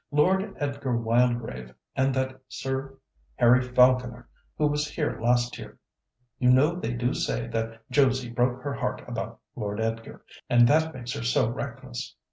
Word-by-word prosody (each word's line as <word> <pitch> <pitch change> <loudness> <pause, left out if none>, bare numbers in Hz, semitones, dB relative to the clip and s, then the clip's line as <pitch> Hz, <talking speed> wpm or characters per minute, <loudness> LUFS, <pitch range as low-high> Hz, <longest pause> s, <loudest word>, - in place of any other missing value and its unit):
Lord 190 +7 +2
Edgar 140 -4 -2
Wildgrave 115 - 0 0.2
and 135 +1 +2
that 130 0 -2
Sir 135 +1 -4 0.4
Harry 125 +1 +5
Falconer 125 -1 +3 0.3
who 155 - +2
was 150 0 +1
here 150 -3 -2
last 120 +1 +1
year - - -10 0.6
(you 125 - +3
know 135 +6 +5
they 170 -10 -3
do 120 +1 0
say 120 0 -1
that 115 0 -4
Josie 130 -2 +2
broke 125 +1 0
her 140 -1 -2
heart - - -3
about - - -5 0.2
Lord 105 0 -4
Edgar, 115 0 -4 0.2
and 120 0 +6
that 160 +3 +2
makes 125 0 -5
her 145 - -4
so 115 -1 +2
reckless). - - -6
125 Hz, 155 wpm, -26 LUFS, 120-135 Hz, 0.6 s, and